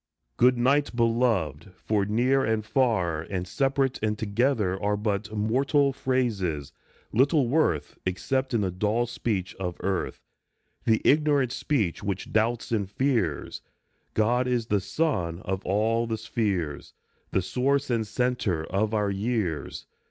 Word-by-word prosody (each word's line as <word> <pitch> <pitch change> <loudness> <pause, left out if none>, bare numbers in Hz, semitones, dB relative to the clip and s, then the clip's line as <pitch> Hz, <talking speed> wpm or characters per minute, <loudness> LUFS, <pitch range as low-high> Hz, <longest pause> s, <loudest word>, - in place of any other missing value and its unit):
" - - -50
Good 125 0 +6
night, 135 +2 +2
Beloved," 115 - +1
for 105 0 0
near 125 +6 +2
and 110 -3 0
far 110 - +1
And 90 +1 -4
separate 135 +4 0
and 105 0 0
together 105 -3 0
are 105 0 +1
But 105 0 -2
mortal 135 +6 +2
phrases, 100 - -1 0.4
little 140 +2 +3
worth 125 - 0
Except 130 +8 -1
in 110 - +2
the 95 -2 0
dull 105 +6 0
speech 105 -5 -2
of 90 -2 -3
earth, 95 -2 -2 0.6
The 110 -1 +2
ignorant 145 -4 +3
speech 110 - -1
which 100 -2 -4
doubts 115 +2 +1
and 100 -4 0
fears. 110 - -1 0.5
God 120 +4 +2
is 120 -2 0
the 105 -3 +1
sun 90 - -1
of 95 0 -3
all 115 +4 +1
the 110 -1 -2
spheres, 100 - -2 0.3
The 95 - 0
source 135 +6 0
and 115 -2 0
centre 110 -8 0
of 105 +3 0
our 105 -1 +1
years. 100 -5 -2
110 Hz, 140 wpm, -26 LUFS, 95-125 Hz, 0.6 s, Good